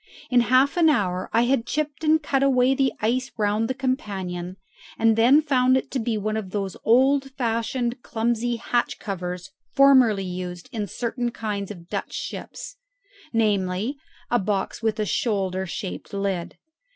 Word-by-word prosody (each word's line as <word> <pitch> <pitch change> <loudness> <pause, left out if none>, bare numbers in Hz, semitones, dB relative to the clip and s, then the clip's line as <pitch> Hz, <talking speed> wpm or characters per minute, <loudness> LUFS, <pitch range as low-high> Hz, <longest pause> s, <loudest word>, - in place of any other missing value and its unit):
In 250 - +5
half 255 +6 +3
an 330 -2 +5
hour 185 -10 0
I 230 - +3
had 245 -1 +1
chipped 300 +1 -2
and 310 0 +3
cut 275 -2 +1
away 260 -1 +4
the 270 -1 +2
ice 255 +4 0
round 210 +1 +1
the 260 - -2
companion, 190 -9 -3 0.4
and 225 0 +4
then 255 +7 +5
found 255 -3 +3
it - - -4
to 265 - -1
be 225 -1 -1
one 215 +1 -2
of 215 -4 -3
those 195 -1 -3
old 270 +4 +4
fashioned 235 0 -1
clumsy 235 +1 -1
hatch 240 +1 -1
covers 180 -2 -5 0.2
formerly 260 -8 +5
used 180 -1 -6
in 210 -3 -3
certain 240 +4 -2
kinds 210 -4 -4
of 175 -5 -10
Dutch - - -4
ships - - -7 0.5
namely, 210 +1 0 0.4
a 240 - +3
box 195 0 -2
with 220 -1 0
a 215 - +1
shoulder 190 -4 -1
shaped 185 +1 -6
lid. 195 -3 -2
225 Hz, 160 wpm, -24 LUFS, 195-255 Hz, 0.5 s, In